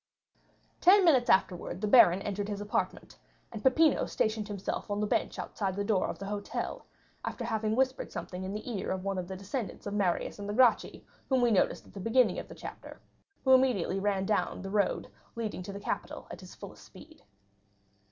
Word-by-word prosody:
50239m - - -40
Ten 380 +2 +7
minutes 260 -8 +4
afterwards 180 -1 +1
the 210 - -1
baron 195 -5 +6
entered 205 0 -3
his 205 -1 -3
apartment, 205 +1 -3 0.3
and 220 - -7
Peppino 305 +6 +4
stationed 215 -1 -1
himself 205 +1 -4
on 205 0 -1
the 210 - +1
bench - - -1
outside 195 -3 -3
the 205 - -1
door 200 -2 +1
of - - -5
the 195 - -7
hotel, 205 0 -4 0.4
after - - -4
having 220 -1 -1
whispered 260 +1 0
something 180 0 -6
in 190 - -4
the 215 - -6
ear 225 -6 -3
of 190 -1 -2
one 195 -1 -2
of 180 - -5
the 190 - -6
descendants 200 +5 -5
of 205 - -4
Marius 195 -1 0
and 200 0 -5
the 205 - -2
Gracchi 250 -2 +3 0.2
whom 265 -1 +3
we 240 - +4
noticed 200 - +1
at - - -18
the 200 - -8
beginning 225 +6 +2
of - - -8
the - - -11
chapter, - - -9 0.4
who 265 - +5
immediately 245 -8 +3
ran 195 -1 0
down 210 -2 -1
the 195 - -5
road 205 -1 0 0.3
leading 220 -5 -4
to 185 - -7
the 200 - -7
Capitol - - -4
at - - -8
his - - -12
fullest - - -11
speed. - - -15
205 Hz, 205 wpm, -30 LUFS, 195-235 Hz, 0.4 s, Ten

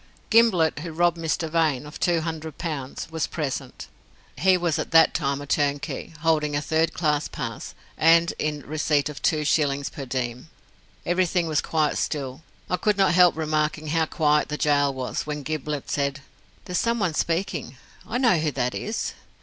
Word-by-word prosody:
Gimblett, 210 -10 +4
who 165 +2 -6
robbed 170 +1 +1
Mr. 160 0 -1
Vane 155 -4 +1
of 150 - -10
two 170 -2 +2
hundred 160 -2 -5
pounds, 145 -6 -4
was 160 -1 -1
present, 135 -4 -4 0.5
he 185 0 +4
was 170 -3 0
at - - -3
that 165 -1 +6
time 140 -3 -1
a 145 - -7
turnkey, 145 0 -1
holding 155 -2 +1
a - - +2
third 160 +2 +1
class 150 -3 0
pass, - - -6 0.2
and 165 +1 +5
in 150 -1 -2
receipt 150 -1 0
of 150 - -8
two 155 -2 +1
shillings 140 -2 +1
per 135 -2 -7
diem. 125 +2 -3 0.6
Everything 175 0 +1
was 155 -2 +1
quite 155 -2 0
still. 140 -1 -3 0.3
I 180 - 0
could 210 +3 +1
not 195 -2 +4
help 180 -2 +5
remarking 155 0 -1
how 160 0 +1
quiet 150 -2 +2
the 150 - -3
gaol 145 -2 +2
was, 130 +2 -4
when 150 -1 -4
Gimblett 150 -1 -4
said, 140 0 -1 0.4
"There's 180 -2 -1
someone 230 -7 0
speaking. 165 -5 -2 0.3
I 230 - -2
know 240 -8 +4
who 155 0 0
that 125 -1 -1
is." 220 +2 -3
155 Hz, 175 wpm, -24 LUFS, 145-170 Hz, 0.6 s, that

